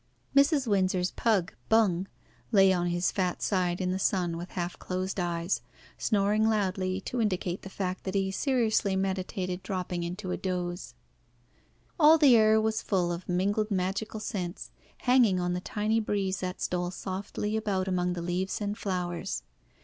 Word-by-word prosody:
Mrs. 280 0 +4
Windsor's 185 -3 +1
pug, 205 -6 +1 0.2
"Bung," 195 -5 +3 0.4
lay 195 -3 +6
on 175 -1 0
his 175 0 +1
fat 185 -3 -1
side 180 -3 +1
in 180 -1 0
the 190 - -1
sun 180 -3 +1
with 175 +2 -6
half 175 -1 -3
closed 185 +1 -3
eyes, 170 -4 -1 0.3
snoring 210 +1 +2
loudly 190 -3 0
to 240 +4 -2
indicate 185 -3 -1
the 195 - -8
fact 185 -1 -3
that 190 0 -3
he 195 -1 +1
seriously 220 -4 +1
meditated 190 -1 -2
dropping 180 -3 -3
into 180 +2 -4
a - - -1
doze. 180 -1 -4 1.0
All 310 +1 +8
the 285 -6 +7
air 220 -1 +5
was 220 0 0
full 180 -4 0
of 175 +2 -6
mingled 205 +4 +1
magical 195 +3 -2
scents, 185 -5 -5 0.3
hanging 245 -7 +4
on 175 0 0
the 180 - -2
tiny 215 +3 0
breeze 200 -3 -1
that 180 0 -4
stole 180 0 -1
softly 195 +3 -4
about 200 -4 -1
among 180 -1 0
the 170 -1 -4
leaves 180 +2 -2
and 205 -1 -2
flowers. 180 - -3
190 Hz, 160 wpm, -29 LUFS, 180-210 Hz, 1.0 s, All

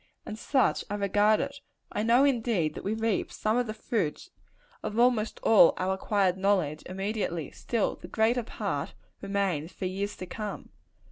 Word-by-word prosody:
And 215 - -5
such 260 +4 +1
I 205 - -2
regard 205 +1 +3
it. 280 0 -5 0.3
I - - -1
know, 235 +4 +4
indeed, 225 - +1
that - - -8
we 210 +3 -1
reap 225 -2 -1
some 215 +1 0
of 245 -1 +1
the 215 - -3
fruits 215 - -2 0.5
of 215 - -4
almost 235 -3 +2
all 215 -6 +7
our 185 +1 0
acquired 190 -1 +1
knowledge, 185 -6 +1
immediately: 195 -4 -3
still, 230 -4 -1
the - - -10
greater 230 +3 +2
part 230 - -4 0.3
remains 195 -5 -1
for 185 - -6
years 195 +2 -3
to 185 - -7
come. 210 +2 -6
205 Hz, 165 wpm, -28 LUFS, 190-225 Hz, 0.5 s, all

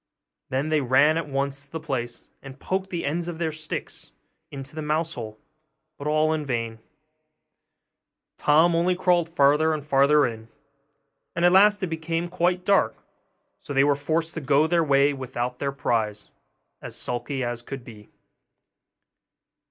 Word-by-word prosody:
Then 135 +4 -1
they 155 -1 +2
ran 135 +4 +4
at 165 -2 -3
once 140 0 -2
to 140 - -26
the 160 - -4
place, 125 -6 -4 0.2
and 135 0 -11
poked 190 +3 -2
the 175 -2 -3
ends 165 +4 -2
of 175 -2 -5
their 160 -1 -1
sticks 155 0 -7 0.4
into 135 0 -9
the 155 - -5
mouse 155 +2 -1
hole, 110 -3 -7 0.6
but 140 - -5
all 155 +1 +2
in 155 -1 -2
vain; 115 -4 -3 1.6
Tom 160 +4 +4
only 175 +2 +2
crawled 175 -2 +2
farther 155 0 +3
and 150 -2 -7
farther 145 +1 +4
in; 115 -2 -5 0.9
and 170 +1 +2
at 175 - +6
last 205 +2 +5
it - - +1
became 165 +1 -3
quite 180 +1 0
dark, 200 -1 +3 0.6
so 145 - -7
that - - -7
they 135 - +5
were 145 0 +4
forced 160 +3 -1
to 160 - -5
go 140 +2 +3
their 170 +1 +2
way 140 -1 +3
without 125 -2 -4
their 140 -1 -1
prize, 110 -6 -2 0.5
as - - -8
sulky 125 +2 -3
as 120 -1 -3
could 135 +1 -8
be. 110 -4 -13
150 Hz, 165 wpm, -25 LUFS, 135-165 Hz, 1.6 s, at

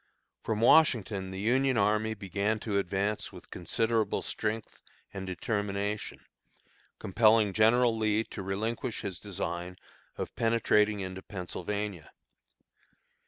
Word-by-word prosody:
From 110 -1 -2
Washington 110 -9 +4
the 95 0 -6
Union 130 +4 +2
army 105 +2 +2
began 100 +2 -1
to 100 -3 0
advance 100 +2 -1
with - - -13
considerable 110 +4 0
strength 110 0 -4 0.3
and 95 -1 -5
determination, 100 +2 -3 0.8
compelling 110 0 +3
General 115 +2 +4
Lee 110 0 +1
to 105 - -8
relinquish 110 +5 -3
his 95 -5 -5
design 90 -2 -4 0.4
of - - -5
penetrating 110 -2 +2
into 95 0 -5
Pennsylvania. 100 -1 -5
105 Hz, 110 wpm, -30 LUFS, 95-110 Hz, 0.8 s, Washington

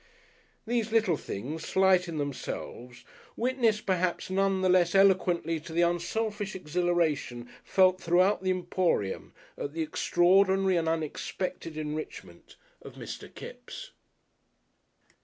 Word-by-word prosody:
These 230 -1 -1
little 220 -7 +3
things, 145 +5 -6
slight 190 -1 +3
in 165 -2 -5
themselves, 125 -3 -6 0.3
witness 235 -3 +1
perhaps 185 -1 -1
none 195 0 +1
the 185 - +2
less 180 -1 +3
eloquently 180 -4 +3
to 160 +1 -10
the 170 +1 +3
unselfish 205 +4 -1
exhilaration 165 -8 -1 0.2
felt 185 -1 +3
throughout 180 +4 +3
the 190 - -1
Emporium 180 - -1 0.3
at 145 - -4
the 165 0 -1
extraordinary 190 +4 +3
and 165 -1 +1
unexpected 165 +1 -4
enrichment 155 0 -7 0.3
of - - -11
Mr. - - -8
Kipps. - - -10
180 Hz, 115 wpm, -28 LUFS, 160-195 Hz, 0.3 s, little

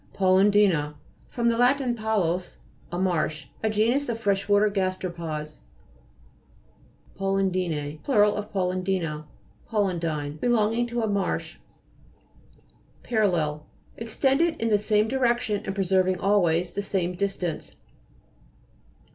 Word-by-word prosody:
PALUDI'NA 190 -5 +3 0.3
fr. 240 - -4
lat. 245 +3 +4 0.2
palus, 190 -6 -1 0.3
a 175 - -3
marsh. 160 -5 -1 0.2
A 220 - +1
genus 235 +6 +1
of 230 - -1
fresh 200 -2 0
water 205 +1 +5
gasteropods. 175 -6 -3 1.6
PALUDI'ITE 185 -6 -1
Plur. 225 -7 +3
of 210 0 -2
paludina. 180 -5 -1 0.4
PALUDINE 165 -8 -1
Belonging 235 +1 +1
to 235 -1 -2
a - - +1
marsh. 200 -3 -2 1.5
PARALLEL 170 -10 0 0.3
Extended 270 +8 +1
in 230 - 0
the 210 -1 +3
same 210 +1 +2
direction 240 -4 0
and 195 - -3
preserving 185 -1 +1
always 180 -4 +2
the 200 - -2
same 185 -3 -1
distance. 180 -3 -3
195 Hz, 105 wpm, -25 LUFS, 175-220 Hz, 1.6 s, water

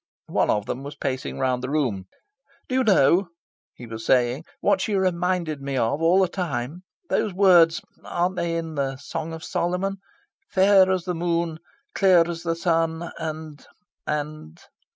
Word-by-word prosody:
One - - +2
of 105 -1 +1
them 125 - -4
was 140 +1 -8
pacing 130 -2 -3
round 130 -1 0
the 130 - -4
room. 125 -11 -1 0.6
"Do - - -5
you 260 0 +3
know," 185 - +4 0.5
he 125 - -10
was 115 -1 -7
saying, 125 +5 +2
"what - - +2
she 215 -3 -1
reminded 180 -4 0
me 135 -1 -3
of, 130 +6 0
all 170 +3 +4
the 190 - +4
time? 165 -4 -4 0.3
Those 200 -4 0
words 180 -2 +5 0.2
aren't 180 +2 -1
they 170 -1 -1
in 165 -1 -4
the 135 -2 -2
Song 165 +4 -5
of 160 0 -7
Solomon? 180 +3 -1 0.5
'fair 190 0 +5
as 185 -2 +1
the 180 - -1
moon, 170 -1 -1 0.3
clear 180 -4 +5
as 170 -1 -5
the 165 -1 -1
sun, 165 0 0
and... 155 -2 -6 0.4
and... 150 - -4
165 Hz, 165 wpm, -24 LUFS, 140-180 Hz, 0.6 s, words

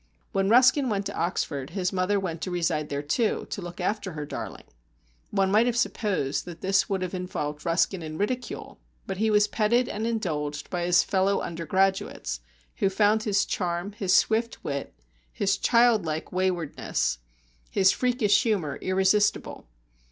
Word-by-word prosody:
When 195 -2 +1
Ruskin 255 +3 +5
went 200 -2 -1
to 200 - -4
Oxford, 145 -6 -2
his 185 0 -2
mother 190 +2 +1
went 170 -4 -4
to - - -3
reside 165 -4 -1
there 140 0 -3
too, 215 - 0
to 200 - -4
look 175 +1 -8
after 195 0 -2
her 150 -1 -5
darling. - - -7 0.7
One 195 -1 +1
might 220 +4 +4
have 240 -1 0
supposed 195 - -1
that 170 -2 -9
this 195 +1 +2
would 190 -2 -1
have 180 - -4
involved 150 -4 -4
Ruskin 175 +2 +1
in 155 -1 -6
ridicule, 245 +6 -4 0.3
but 195 - -4
he 220 +2 +1
was 210 -1 +4
petted 235 +4 +2
and 220 0 -3
indulged 150 -10 -3
by 175 -1 -1
his 175 0 +5
fellow 195 +1 +1
undergraduates, 170 - -1 0.4
who 195 - +2
found 210 +2 +3
his 205 -2 +1
charm, 175 +1 -2
his 195 -3 +1
swift 225 +1 +1
wit, 140 -1 -4 0.4
his 195 -1 +1
childlike 215 -9 +2
waywardness, 175 - -1 0.5
his 190 0 +4
freakish 245 -5 +2
humour 195 -11 -1
irresistible. 190 +3 +1
190 Hz, 160 wpm, -26 LUFS, 170-210 Hz, 0.7 s, Ruskin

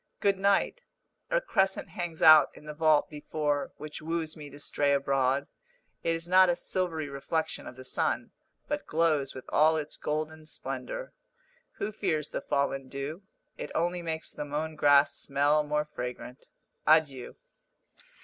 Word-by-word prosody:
Good 200 -1 +2
night! 200 - +2 0.5
A - - +3
crescent 195 - +1
hangs 175 -3 -4
out 155 -3 +9
in - - -14
the 150 - -6
vault 155 -1 +3
before, 150 -1 -2
which 150 0 -7
woos 160 0 -2
me 150 -2 -9
to 145 - -12
stray 145 0 0
abroad. 135 0 +1 0.6
It 165 - +1
is 165 +1 -6
not 185 +1 +6
a 175 - +3
silvery 170 -5 -2
reflection 140 +3 -3
of - - -9
the 130 - -10
sun, 130 - -1 0.4
but 295 0 -3
glows 155 -4 +1
with 130 - -8
all 155 +1 +4
its 150 -1 -4
golden 155 +1 -3
splendour. - - -5 0.6
Who 215 - -3
fears 165 -8 -1
the - - -3
fallen 135 -1 -1
dew? 140 +6 -5 0.4
It - - -5
only 175 +1 0
makes 160 -1 -4
the - - -4
mown 150 +2 -3
grass 145 -1 +5
smell 145 +2 +2
more 150 0 -1
fragrant. 125 -2 -7 0.4
Adieu! 150 -5 +3
155 Hz, 155 wpm, -29 LUFS, 145-165 Hz, 0.6 s, out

